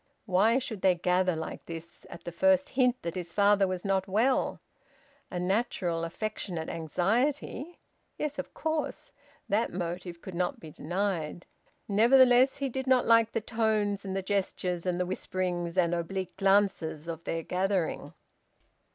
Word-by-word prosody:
Why 215 +4 +3
should 230 -6 -4
they 185 -2 +4
gather 180 0 +1
like 160 0 -6
this 165 0 -9
at 170 - -10
the 175 - -5
first 190 +2 +3
hint 250 -1 +2
that 170 - -3
his 175 -2 -5
father 205 -1 +4
was 185 0 -4
not 190 -1 +1
well? 225 +7 +1 0.7
A 180 - -4
natural 180 -3 0
affectionate 170 -2 -4
anxiety... 240 - -1 0.4
Yes, 295 -1 -3
of 275 - -5
course, 315 -1 -3 0.4
that 220 +3 +1
motive 175 0 -4
could 190 - -9
not 175 +1 -1
be 160 - -10
denied. 175 0 -3 0.4
Nevertheless, 245 +4 +5
he 275 - -1
did 265 +1 -4
not 260 -1 +4
like 230 -1 +4
the 225 - 0
tones 215 -3 0
and 190 -1 -4
the 195 - -2
gestures 185 -3 -1
and 180 -1 0
the 180 - +1
whisperings 180 -1 -3
and 175 -2 +3
oblique 180 +2 -3
glances 195 -6 +1
of 165 -1 -6
their 165 0 -2
gathering. 185 -1 -1
190 Hz, 150 wpm, -29 LUFS, 175-220 Hz, 0.7 s, Nevertheless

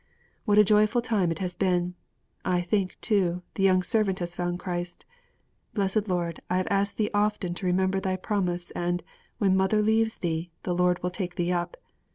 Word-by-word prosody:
What 205 -2 +3
a 210 - +9
joyful 210 +3 +4
time 205 -8 +1
it 165 - -2
has 180 0 -3
been! 180 -2 0 0.5
I 180 -1 +1
think, 185 +1 -1
too, 180 -5 +1
the - - -4
young 185 -1 +4
servant 195 -1 +1
has 175 -1 -4
found 175 0 -2
Christ. 175 -1 -4 0.7
Blessed 200 +1 +1
Lord, 175 -3 -1
I 180 - +1
have 185 - 0
asked 200 0 +1
Thee 210 -1 0
often 205 -3 +1
to 185 +1 -4
remember 190 +1 +2
Thy 190 -1 -1
promise, 180 -3 -1
and 175 0 -2 0.3
"when 195 -2 +3
mother 190 +3 +3
leaves 220 +1 +2
thee, 165 0 -2
the 180 - -1
Lord 180 0 +2
will 180 - 0
take 180 -2 -4
thee 175 0 0
up." 175 - -2
185 Hz, 190 wpm, -27 LUFS, 175-205 Hz, 0.7 s, a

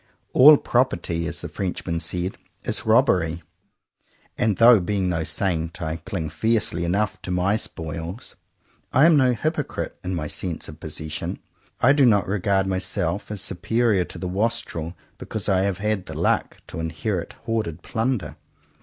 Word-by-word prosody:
*'A11 145 +3 +8
proper 125 +2 +2
ty," 85 0 -5
as - - -3
the - - -5
Frenchman 90 -3 -3
said, 90 +3 -2 0.3
"is - - -2
robbery;" 80 -1 +3 0.9
and 110 -5 +1
though, 115 -1 +8
being 95 +1 -1
no 80 -2 0
saint, 80 +1 -1
I 80 -1 -3
cling 80 -1 -5
fiercely 110 -4 0
enough 105 +4 0
to - - -7
my 90 +3 +1
spoils, 85 +1 -5 0.6
I 135 - +5
am 165 -1 +6
no 130 -3 +4
hypocrite 155 +7 -3
in 90 0 -2
my 80 -3 -3
sense 85 +2 -4
of 75 0 -11
possession. 80 0 -3 0.4
I 135 - +6
do 140 -3 +5
not 100 -5 +3
regard 95 0 +1
myself 95 -1 -1
as 105 -3 -4
superior 100 +2 +1
to - - -8
the 90 - -4
wastrel 90 -4 -2 0.2
because 110 -3 -4
I 95 -2 +3
have 100 -2 -1
had 105 -2 -1
the - - -6
luck - - +1
to - - -6
inherit 80 +3 -3
hoarded 110 -9 -2
plunder. 115 -2 -2
95 Hz, 160 wpm, -23 LUFS, 85-110 Hz, 0.9 s, A11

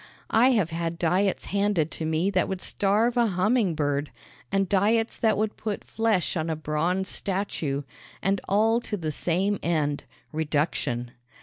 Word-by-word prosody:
I 235 +4 +5
have 190 -8 +1
had 165 0 -2
diets 185 +4 +1
handed 200 -6 +1
to 160 - -4
me 160 +5 +1
that 185 -2 +2
would 190 -1 -3
starve 215 +5 +1
a 235 -1 +4
humming 195 0 +2
bird, 145 -1 0 0.4
and 195 0 +2
diets 215 +4 +2
that 220 -2 +2
would 215 0 -1
put 215 -2 -4
flesh 220 -6 0
on 160 -1 -1
a 160 - 0
bronze 165 +5 -1
statue; 180 -9 -2 0.4
and 195 +1 0
all 225 +4 +3
to 210 - -4
the 160 -4 -3
same 185 +6 0
end 150 -4 0 0.3
reduction. 145 -6 -1
185 Hz, 160 wpm, -26 LUFS, 160-205 Hz, 0.4 s, I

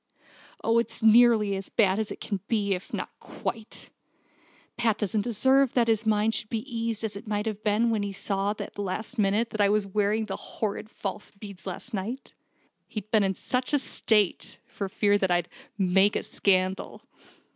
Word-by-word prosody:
Oh, 230 +1 +3
it's 235 - -4
all 220 - +8
nearly 220 -3 +5
as 195 -1 -5
bad 200 -2 +3
as 220 - -1
it - - -7
can 200 -3 -3
be, 205 -3 +1
if 185 +1 -6
not - - -4
quite! 220 -2 -6 0.8
Pat 230 -3 +1
doesn't 210 0 0
deserve 260 +4 +2
that 240 -2 +4
his 225 -1 +1
mind 215 +1 +3
should 215 - -2
be 220 -1 -3
eased 230 -1 -2
as 215 -2 -1
it 210 +3 -9
must 210 0 -1
have 215 -1 -4
been 220 +2 +2
when 220 -2 +1
he 205 0 -2
saw 195 +1 -1
at - - -6
the 205 - -5
last 215 +5 -4
minute 210 +3 +2
that 215 - -1
I 200 - +5
was 210 0 +2
wearing 210 +2 +1
the 195 -2 -4
horrid 215 0 -4
false 200 -1 -5
beads 200 -2 -11
last 190 +6 -6
night. 220 +7 -4 0.5
He'd 215 -2 -7
been 215 -2 +4
in 190 -1 0
such 255 +8 -2
a - - +6
state, 210 - 0
for 200 -2 -5
fear 205 +1 +2
I'd 175 -1 +1 0.3
'make 195 +1 +3
a - - -1
scandal!' 185 -1 0
210 Hz, 190 wpm, -27 LUFS, 200-225 Hz, 0.8 s, all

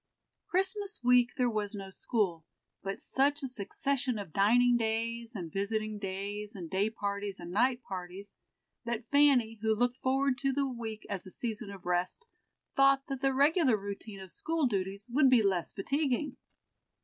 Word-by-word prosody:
Christmas 385 - 0
week 245 0 +5
there 250 - +3
was 215 -2 -2
no 195 -1 -7
school, 190 -6 -1 0.4
but 195 0 -4
such 285 +2 +1
a - - -1
succession 250 +2 -1
of 195 -7 -7
dining 240 +5 +5
days, 230 +1 -1
and 170 -5 -5
visiting 215 +1 -2
days, 200 +2 -4
and 175 -4 -7
day 195 +3 +2
parties, 200 -2 -4
and 175 0 -7
night 245 +5 +2
parties, 185 +1 -7 0.5
that 235 -1 -3
Fanny, 265 -6 +4
who 220 0 +2
looked 245 +2 +1
forward 265 0 +1
to 275 +1 +1
the 280 +1 +1
week 230 -4 -6
as 195 -2 -4
a - - -8
season 220 +1 -2
of 195 -2 -10
rest, 180 - 0 0.5
thought 275 0 +5
that 270 -1 -3
the 270 -1 +3
regular 280 - +4
routine 200 0 -7
of 190 -2 -10
school 325 -2 -1
duties 200 -2 -2
would 270 +1 +5
be 245 -4 +5
less 185 -4 +1
fatiguing. 280 +4 -1
225 Hz, 165 wpm, -31 LUFS, 200-265 Hz, 0.5 s, week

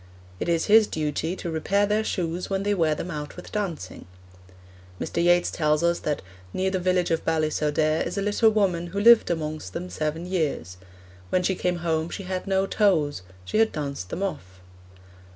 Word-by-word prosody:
It - - -2
is 165 -1 +2
his 215 0 +6
duty 155 +3 -2
to 170 - -5
repair 195 +6 +1
their 210 +1 +1
shoes 175 -4 -2
when 195 0 -1
they 205 0 +1
wear 160 -5 +2
them 180 - -5
out 150 -2 -6
with - - -10
dancing. 180 - -4 0.9
Mr. 170 - -1
Yeats 175 0 +4
tells 150 0 +1
us 170 0 +2
that 150 -1 -2 0.3
'near 190 0 0
the 190 - 0
village 180 -1 +1
of 165 - 0
Ballisodare 155 -1 +1
is 175 - -4
a 200 - 0
little 210 +2 +3
woman 190 -5 +1
who 195 +4 -4
lived 235 +2 +7
amongst 155 - -3
them 90 - -5
seven 155 - -3
years. 155 - -2 0.5
When 180 - +1
she 190 - +2
came 180 -1 -1
home 160 0 0
she 195 - -6
had 185 +1 -4
no 190 0 +2
toes 165 - +1 0.2
she 215 - 0
had 225 0 +4
danced 140 -11 -4
them 190 - -3
off.' 95 - -5
170 Hz, 190 wpm, -25 LUFS, 155-195 Hz, 0.9 s, lived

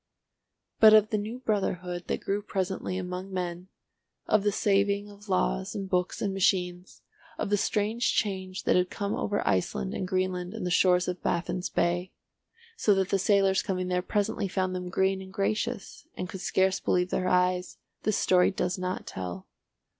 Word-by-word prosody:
But 215 -1 +9
of 215 0 +5
the 215 - +2
new 220 +4 -5
brotherhood 180 -5 -2
that - - -2
grew 200 +1 -1
presently 190 -2 -3
among 185 +1 -5
men, 180 -1 -4 0.6
of 215 - +3
the 205 +1 +1
saving 200 0 +1
of 205 +1 -15
laws 60 - 0
and 195 -1 -3
books 180 -1 -1
and 200 -2 0
machines, 180 -2 0 0.3
of - - -3
the - - +5
strange 215 +3 0
change 190 -2 -2
that - - +3
had 180 0 +2
come 200 0 -3
over 205 -1 -1
Iceland 90 -10 0
and 185 - -3
Greenland 185 -1 -1
and - - -4
the 180 - -1
shores 180 0 +4
of 180 0 -3
Baffin's 180 +1 -1
Bay, 175 +2 0 0.6
so 210 - +3
that 190 0 0
the 195 - +2
sailors 195 -1 +3
coming 185 -1 -2
there 180 0 +1
presently 200 +1 -1
found 185 0 -1
them 180 -1 -4
green 190 +1 +1
and 190 0 -10
gracious, 215 +3 -2
and 180 - -3
could 185 0 -7
scarce 190 0 +2
believe 180 0 +1
their 185 - 0
eyes, 180 0 +1 0.2
this 215 -1 +1
story 180 -1 +4
does 185 -1 -2
not 185 0 -3
tell. 90 0 -6
185 Hz, 175 wpm, -28 LUFS, 180-200 Hz, 0.6 s, But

